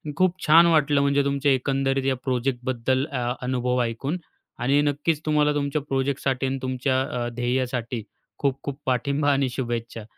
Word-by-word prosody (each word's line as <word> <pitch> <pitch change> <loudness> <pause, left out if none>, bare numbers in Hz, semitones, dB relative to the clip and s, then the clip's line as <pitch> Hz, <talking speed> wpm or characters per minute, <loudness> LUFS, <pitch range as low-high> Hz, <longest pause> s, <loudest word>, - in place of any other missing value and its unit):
खूप 185 +2 +1
छान 165 +3 +7
वाटलं 150 -3 +3
म्हणजे 140 0 +2
तुमच्या 140 0 +1
एकंदरीत 135 0 0
या 135 -1 +2
प्रोजेक्टबद्दल 130 0 0
अ, 125 -5 -2
अनुभव 125 0 0
ऐकून 130 +8 -2 0.4
आणि 135 +4 +3
नक्कीच 145 +2 0
तुम्हाला 150 -1 +3
तुमच्या 145 +1 -1
प्रोजेक्टसाठी 135 -1 -1
अन् 135 +1 -1
तुमच्या 130 0 0
अ, 125 -2 -3
ध्येयासाठी 125 -1 -2 0.4
खूप 135 -1 0
खूप 140 -1 -5
पाठिंबा 140 +3 +1
आणि 135 -2 +1
शुभेच्छा. 120 -3 -4
135 Hz, 145 wpm, -24 LUFS, 125-140 Hz, 0.4 s, छान